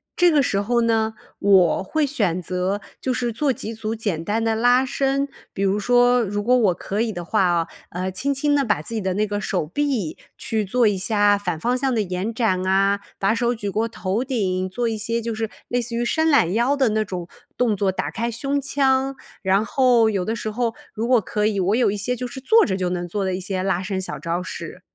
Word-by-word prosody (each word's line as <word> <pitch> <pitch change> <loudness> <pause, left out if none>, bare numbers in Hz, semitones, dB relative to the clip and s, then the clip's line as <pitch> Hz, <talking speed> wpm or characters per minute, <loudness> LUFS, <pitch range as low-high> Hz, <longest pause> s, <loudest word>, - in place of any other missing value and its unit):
这 355 -1 +5
个 290 -2 +4
时 200 -5 0
候 235 +4 +1
呢， 225 -1 +1 0.3
我 190 -4 +4
会 310 +10 0
选 200 - 0
择， 185 +3 -2 0.2
就 260 - -1
是 240 0 -1
做 275 +4 0
几 225 -1 -6
组 220 0 -4
简 205 -8 -2
单 220 +4 0
的 225 0 +1
拉 245 +3 +4
伸， 275 +1 0 0.2
比 195 - -2
如 195 +1 +2
说 245 +2 +4
如 205 0 -2
果 250 +3 +4
我 210 -7 +3
可 200 +4 -4
以 230 -2 -1
的 175 - -5
话 180 +2 +2
哦， 170 -1 +1 0.2
呃， 185 +2 -3
轻 275 +10 -1
轻 290 +2 +1
地 280 -1 +2
把 210 - +1
自 230 - -5
己 225 - -1
的 190 -2 -1
那 210 +3 +1
个 205 0 -3
手 185 -5 -1
臂， 230 - -2 0.2
去 220 -2 -1
做 240 +5 +2
一 200 - -1
下 205 +1 +3
反 180 -5 -3
方 245 +9 0
向 260 -1 0
的 220 - +2
延 190 +3 -3
展 200 -6 0
啊， 195 +1 +3 0.2
把 195 +2 +2
手 240 +1 0
举 205 -3 -4
过 220 +3 0
头 210 -1 -2
顶， 185 -8 -1
做 235 +5 -1
一 220 - -2
些 230 +2 -1
就 230 0 -3
是 220 0 -3 0.2
类 245 0 +1
似 235 0 -4
于 235 - 0
伸 315 +6 +1
懒 275 - +4
腰 240 +6 +2
的 265 -4 +2
那 215 0 0
种 180 -3 -6 0.3
动 230 -4 +1
作， 195 0 +1
打 190 - -2
开 235 +2 -2
胸 275 +5 -1
腔。 270 -1 +1 0.3
然 195 +2 +2
后 240 -1 +3
有 195 -4 -1
的 225 - -1
时 220 -1 -4
候 230 +1 -1 0.2
如 225 +1 -2
果 250 -2 +4
可 210 +2 -1
以 205 -2 +1
我 190 +4 +2
有 250 - +3
一 205 - -1
些， 245 +5 -2
就 250 +1 -4
是 265 +1 -8
坐 445 +12 +5
着 190 - -1
就 185 -1 -1
能 175 -1 -3
做 200 +3 -2
的 190 -1 -1
一 - - -4
些 185 0 -3
拉 190 -2 0
伸 190 0 -3
小 185 - -5
招 170 +1 -2
式。 175 0 -7
220 Hz, 260 characters per minute, -22 LUFS, 190-245 Hz, 0.3 s, 这